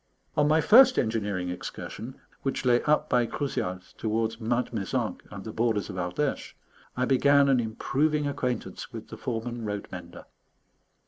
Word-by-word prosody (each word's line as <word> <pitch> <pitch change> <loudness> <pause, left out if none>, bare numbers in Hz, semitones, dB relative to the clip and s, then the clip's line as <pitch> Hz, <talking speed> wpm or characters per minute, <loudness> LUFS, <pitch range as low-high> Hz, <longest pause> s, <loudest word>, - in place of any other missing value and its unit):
On 150 0 +3
my 155 +1 +4
first 255 - +7
engineering 105 -6 0
excursion, 110 +7 -7 0.2
which 135 -1 -2
lay 120 -1 +4
up 150 0 +3
by 120 -1 +2
Crouzials 95 -10 -3
towards 110 +1 -1
Mount 120 +2 0
Mézenc 100 -4 -2
and 100 -2 -8
the 110 - -6
borders 110 -3 0
of - - -8
Ardèche, 90 +11 -2 0.4
I 125 - +2
began 140 +2 +5
an 135 -2 +4
improving 145 +7 0
acquaintance 130 -5 -3
with - - -8
the - - -8
foreman 120 0 -4
road 105 -1 -4
mender. 85 -2 -9
120 Hz, 150 wpm, -27 LUFS, 105-140 Hz, 0.4 s, first